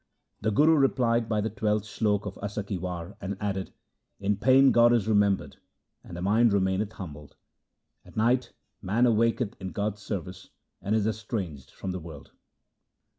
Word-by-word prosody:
The 110 - +1
Guru 155 +9 +4
replied 120 -4 +2
by 110 -2 +1
the 110 - -1
twelfth 105 0 0
slok 105 -1 0
of 100 -1 -5
Asa 105 +1 -4
ki 100 -2 -4
War, 90 +1 -5
and 100 0 -4
added: 95 -2 -3 0.2
— - - -53
' - - -51
In 105 - +3
pain 130 +6 +5
God 120 0 +5
is 110 -4 +1
remembered 100 -8 +1 0.5
and 85 - -9
the 90 - -5
mind 110 +3 +4
remaineth 100 +2 0
humbled. 75 -8 -9 0.7
At - - -16
night 120 +3 +2 0.3
man 110 +6 +2
awaketh 115 -1 +2
in 95 -1 -5
God's 105 0 -2
service 95 -3 -6 0.3
and 105 +3 0
is 110 -2 +1
estranged 100 - -4
from 95 - -6
the 90 - -4
world.' 80 -4 -11
105 Hz, 175 wpm, -27 LUFS, 95-115 Hz, 0.7 s, pain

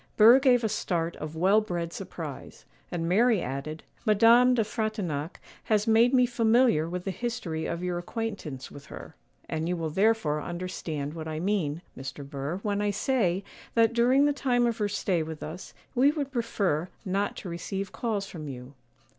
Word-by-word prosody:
Burr 230 +5 +8
gave 250 -3 +4
a - - +3
start 170 -5 -1
of 155 +1 -6
well 195 +6 +4
bred 175 -5 -4
surprise; - - -8 0.3
and 165 -1 -2
Mary 220 +4 +4
added:— 145 +2 -5 0.2
'Madame 230 +4 +6
de 225 - +3
Frontignac 205 -8 -3 0.3
has 210 -1 +2
made 230 +2 +5
me 255 -2 +5
familiar 230 -8 +3
with 180 +1 -4
the 195 - -2
history 185 -9 -3
of 170 +1 -3
your 180 -1 -1
acquaintance 175 - -5
with 145 +1 -12
her; 160 - -10 0.3
and 160 +1 -2
you 180 - 0
will 160 -2 -3
therefore 190 -5 +2
understand 170 -4 -4
what 160 -1 -6
I 155 0 -3
mean, 175 -4 -1
Mr. 135 +1 -7
Burr, 140 +4 -4
when 205 -1 0
I 205 - +1
say 200 -4 +1 0.3
that, 230 0 +4
during 250 +4 +4
the 290 - +3
time 245 -3 +1
of 235 -1 -1
her 205 -1 +1
stay 190 -4 0
with 160 -1 -6
us, 165 +4 -7 0.2
we 265 +2 +5
would 290 -2 -2
prefer 200 - -1 0.2
not 200 +2 -1
to 185 - -6
receive 190 +3 -4
calls 215 -4 -2
from 160 -6 -8
you. 130 0 -8
190 Hz, 180 wpm, -28 LUFS, 160-230 Hz, 0.3 s, Burr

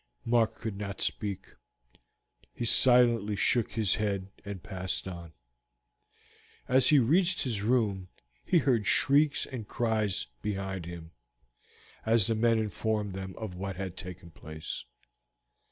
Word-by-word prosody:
Mark 115 -1 +2
could 110 -3 -5
not 100 -1 -5
speak. 100 -3 -2 1.0
He 120 - -3
silently 120 -4 +4
shook 120 +3 +1
his 110 -5 +1
head 100 -3 -2
and 100 -3 -7
passed 95 0 -3
on. 85 -3 -8 1.4
As 130 +1 +4
he 150 - +6
reached 170 +9 +3
his 115 -6 -2
room 105 -5 +1 0.4
he 180 - +2
heard 125 - +2
shrieks 145 +6 +4
and 120 -6 -7
cries 110 -5 0 0.2
behind 95 -2 -4
him, 85 -2 -9 0.9
as 110 -2 +4
the 115 - +1
men 115 +1 +3
informed 105 -1 -2
them 95 0 -6
of 110 -5 -6
what 95 +1 -5
had 95 -1 -5
taken 90 -2 -9
place. 80 0 -7
105 Hz, 130 wpm, -29 LUFS, 95-115 Hz, 1.4 s, he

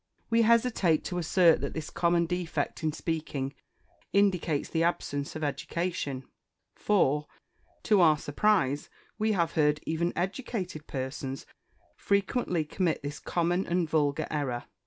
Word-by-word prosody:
We 230 0 +5
hesitate 225 -8 +3
to 180 -1 -3
assert 170 0 +4
that - - -4
this 160 -1 -5
common 170 0 +2
defect 175 -1 -3
in 155 - +1
speaking 150 -4 -3 0.6
indicates 180 -7 +2
the 165 - -1
absence 145 -4 -1
of 155 - -4
education 145 -2 -2 0.5
for, 150 -8 +2 0.6
to 210 -4 +4
our 155 -3 +6
surprise, 145 -3 +1 0.3
we 215 0 +2
have 170 -4 +1
heard 150 -2 +2
even 170 +2 0
educated 185 - -3
persons 135 0 -4 0.5
frequently 200 -4 0
commit 165 0 -1
this 145 +1 -5
common, 175 +2 0
and 175 -1 +1
vulgar 150 -3 +1
error. 130 -5 -2
165 Hz, 130 wpm, -29 LUFS, 150-185 Hz, 0.6 s, our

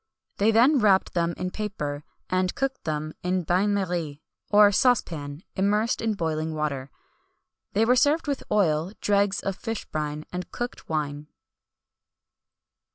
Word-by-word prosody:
They 205 +2 +3
then 250 +6 +5
wrapped 200 -4 +3
them 170 -1 0
in 185 0 -3
paper,[M] 150 -10 -4 0.3
and 185 0 0
cooked 270 -1 -2
them 155 0 -3
in 180 +1 0
a - - -9
bain 185 +5 +2
marie, 175 -7 -2 0.3
or 205 0 +7
saucepan, 165 - +1
immersed 210 +4 +1
in 225 -2 0
boiling 160 -2 -2
water. 140 -3 -2 0.8
They 215 +3 +3
were 250 +2 +4
served 290 +5 +3
with 280 -2 -2
oil, 170 -2 +2
dregs 200 -1 +2
of 195 - -2
fish 225 +2 -5
brine, 150 0 -4
and 180 0 -4
cooked 240 0 -6
wine. 150 -1 -2
185 Hz, 145 wpm, -26 LUFS, 155-210 Hz, 0.8 s, or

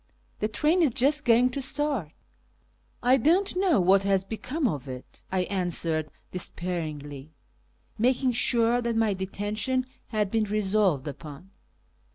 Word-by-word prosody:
" - - -39
The 215 - 0
train 305 +11 +1
is 315 - +4
just 275 +5 +1
going 245 +1 +4
to 275 - -3
start." 270 - -1 0.5
" - - -38
I 265 - +7
don't 350 - +2
know 365 - +3
what 190 +2 +4
has 195 -1 +1
become 255 +8 -2
of 145 - -4
it," 125 0 -9
I 185 -1 +1
answered 170 -4 -1 0.2
despairingly, 155 -5 -3 0.6
making 255 +2 +2
sure 235 0 +2
that 235 -1 -2
my 225 -2 +2
detention 205 +7 -2 0.2
had 210 -3 -1
been 225 -1 +1
resolved 200 -8 +1
upon. 150 +5 -9
210 Hz, 145 wpm, -27 LUFS, 180-255 Hz, 0.6 s, I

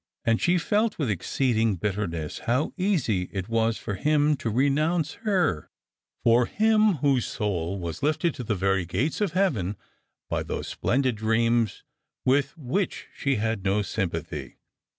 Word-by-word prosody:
And 115 0 +2
she 180 +1 +3
felt 210 +5 +1
with 140 -8 0
exceeding 110 +2 +1
bitterness 85 -5 -3
how 130 +6 +1
easy 145 - 0
it 95 -2 -4
was 115 0 +1
for 105 - -5
him 150 +7 +2
to 115 - -3
renounce 150 +7 +1 0.2
her— 175 - +1 0.5
for 120 +1 +4
him, 215 -1 +3
whose 135 -4 +3
soul 95 -3 -2
was 85 -2 -5
lifted 155 +2 +1
to 125 - -6
the 110 -2 -1
very 95 0 +1
gates 105 - -1
of 200 -5 0
heaven 115 - 0 0.5
by - - -1
those - - -4
splendid 130 -2 0
dreams 115 0 +1 0.4
with 140 +3 +2
which 165 +7 -2
she 140 -1 0
had 110 -2 -1
no 100 +2 +1
sympathy. 85 -5 -4
120 Hz, 150 wpm, -26 LUFS, 100-155 Hz, 0.5 s, for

